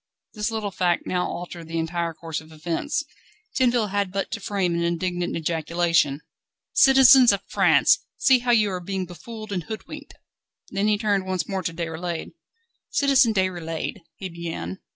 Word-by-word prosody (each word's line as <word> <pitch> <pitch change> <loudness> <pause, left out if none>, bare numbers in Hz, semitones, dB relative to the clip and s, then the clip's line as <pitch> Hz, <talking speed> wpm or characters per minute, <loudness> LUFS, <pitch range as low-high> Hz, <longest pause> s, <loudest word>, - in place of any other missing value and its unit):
This 210 0 -2
little 220 -3 -3
fact 180 -2 0
now 180 -1 -1
altered 175 -1 -7
the 165 0 -4
entire 165 0 -2
course 160 -1 -5
of 160 0 -16
events. 170 - -2 0.5
Tinville 240 -4 +2
had 200 -2 0
but 195 +1 -3
to 225 - -3
frame 195 -4 -1
an 170 - -1
indignant 175 +1 -1
ejaculation: 165 -2 +1 0.5
"Citizens 265 -2 +7
of 200 -1 -2
France, - - +4 0.2
see 260 -2 +5
how 245 0 -4
you 215 -4 +4
are 180 - -3
being 190 +1 -3
befooled 215 +5 -9
and 185 -3 -1
hoodwinked!" 220 -1 -8 0.6
Then 200 +1 0
he 210 -1 +3
turned 200 -3 0
once 185 -1 -2
more 195 -2 -2
to 175 - -2
Déroulède. 165 0 -4 0.6
"Citizen 275 -4 +4
Déroulède 175 -4 -2
..." - - -59
he 190 - -5
began. 165 - -6
185 Hz, 165 wpm, -24 LUFS, 170-215 Hz, 0.6 s, Citizens